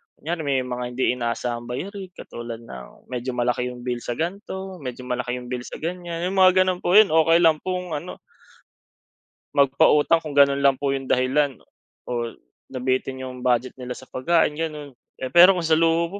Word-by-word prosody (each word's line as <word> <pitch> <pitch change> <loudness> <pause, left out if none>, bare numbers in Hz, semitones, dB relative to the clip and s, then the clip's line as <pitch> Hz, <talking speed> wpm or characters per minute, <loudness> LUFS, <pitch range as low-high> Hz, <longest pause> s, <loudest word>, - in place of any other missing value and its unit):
Kunyari 170 +3 -4
may 140 -4 0
mga 125 0 -4
hindi 130 - +2
inaasahang 120 -1 -3
bayarin 190 - -5
katulad 120 -1 -8
ng 65 - -12
medyo 125 0 -3
malaki 125 0 0
yung 125 -1 -8
bill 125 -1 -2
sa 120 0 -4
gan'to, 190 +2 -5
medyo 125 -3 -7
malaki 125 0 -3
yung 125 0 -8
bill 125 -1 -4
sa - - -8
ganyan. 175 -1 -4
Yung 195 - -1
mga 185 0 +6
ganon 185 -1 -1
po, 180 - +1
yun 215 -3 +7
okey 165 +2 +4
lang 160 -2 +4
pong 180 -1 -4
ano. 155 +4 -5 1.4
Magpautang 145 +3 +4
kung 150 -3 -7
ganun 140 0 +5
lang 140 -1 +4
po 140 +1 -1
yung 135 -1 -4
dahilan 130 +2 +1 0.5
o - - -6 0.6
nabitin 130 0 -2
yung 125 -1 -8
budget 125 0 +1
nila 125 0 -6
sa - - -11
pagkain 155 +4 +1
ganon. 150 -2 -5 0.2
Eh 130 -1 -6
pero 180 +2 +8
kung 175 - -2
sa 160 - +1
luho 165 +1 +2
140 Hz, 180 wpm, -23 LUFS, 125-170 Hz, 1.4 s, pero